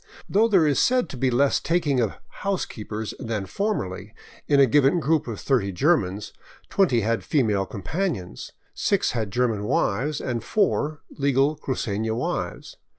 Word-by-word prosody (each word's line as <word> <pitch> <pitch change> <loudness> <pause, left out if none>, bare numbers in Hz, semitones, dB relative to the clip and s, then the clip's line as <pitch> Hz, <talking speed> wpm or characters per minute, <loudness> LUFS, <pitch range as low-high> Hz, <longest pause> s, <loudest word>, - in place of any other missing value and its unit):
Though 220 +3 +3
there 190 -7 +4
is 145 -2 +2
said 250 0 +2
to - - -7
be 130 +1 +1
less 135 +3 +3
taking 160 -6 +1
of 115 -4 +1
'' - - -37
housekeepers 110 - -3
" - - -33
than 110 -6 -3
formerly, 105 - -3 0.3
in 140 -1 +4
a 135 - +8
given 140 +5 +3
group 155 -2 +1
of 110 -4 -5
thirty 120 -8 +1
Germans, 100 - 0 0.4
twenty 155 -12 +3
had 115 +2 0
female 105 - +1
companions, 105 - -4 0.2
six - - +1
had 110 -4 -2
German 115 -1 0
wives, 130 +8 0
and 120 -4 -3
four, 155 - 0
legal 140 +1 +1
crucena 110 -6 -2
wives. 120 - -4
130 Hz, 155 wpm, -24 LUFS, 105-155 Hz, 0.4 s, a